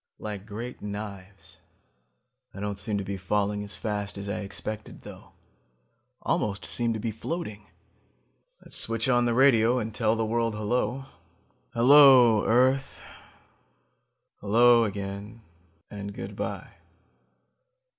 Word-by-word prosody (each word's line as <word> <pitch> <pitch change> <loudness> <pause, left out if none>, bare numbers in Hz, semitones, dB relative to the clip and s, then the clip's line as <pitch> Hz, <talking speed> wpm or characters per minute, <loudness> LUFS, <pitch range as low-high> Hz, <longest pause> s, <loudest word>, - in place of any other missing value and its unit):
Like 105 -1 -7
great 115 +4 -7
knives. 100 -2 -9 0.9
I - - -8
don't 100 0 -4
seem 105 -1 -3
to 100 - -3
be 100 0 -5
falling 105 +2 -1
as 100 -1 -8
fast 105 0 -4
as 100 0 -6
I 110 +2 -3
expected 105 +1 -7
though. - - -12 0.9
Almost 100 -1 -1
seem 120 -1 -1
to 110 - -4
be 115 +1 -3
floating. 110 - -6 1.0
Let's - - -4
switch 115 +1 +1
on 120 -1 +3
the 120 -1 +1
radio 125 -2 +4
and 110 -2 -3
tell 110 0 +1
the 115 0 -1
world 115 0 -1
hello. 120 +4 -1 0.7
Hello, 125 -3 +7
earth... 130 +3 +2 1.3
hello, 115 +3 +4
again... 100 +2 -6 0.5
and 100 0 -6
good - - -7
by - - -5
110 Hz, 125 wpm, -27 LUFS, 100-120 Hz, 1.3 s, Hello